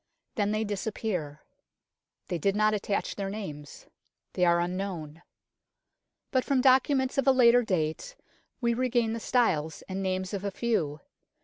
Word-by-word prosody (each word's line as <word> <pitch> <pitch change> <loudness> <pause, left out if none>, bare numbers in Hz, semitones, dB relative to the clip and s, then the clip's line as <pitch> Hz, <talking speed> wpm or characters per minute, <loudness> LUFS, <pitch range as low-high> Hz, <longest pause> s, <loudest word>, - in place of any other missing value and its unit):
Then 205 -3 0
they 215 +1 0
disappear. 200 -7 -3 0.8
They 175 - -2
did 195 +5 +1
not 215 0 +3
attach 205 -1 -2
their 195 -1 -3
names. 155 -9 -7 0.5
They 180 - 0
are 170 0 +4
unknown. 175 -3 -4 1.1
But 260 -2 +2
from 275 -2 +1
documents 265 +1 +3
of 275 - 0
a - - +8
later 245 -2 +6
date 185 - -2 0.5
we 235 -1 +2
regain 240 -2 +1
the 230 - -3
styles 170 -11 0
and 190 0 -5
names 185 0 -2
of 200 -1 -3
a 200 - -1
few. 175 -9 -1
205 Hz, 145 wpm, -28 LUFS, 175-235 Hz, 1.1 s, a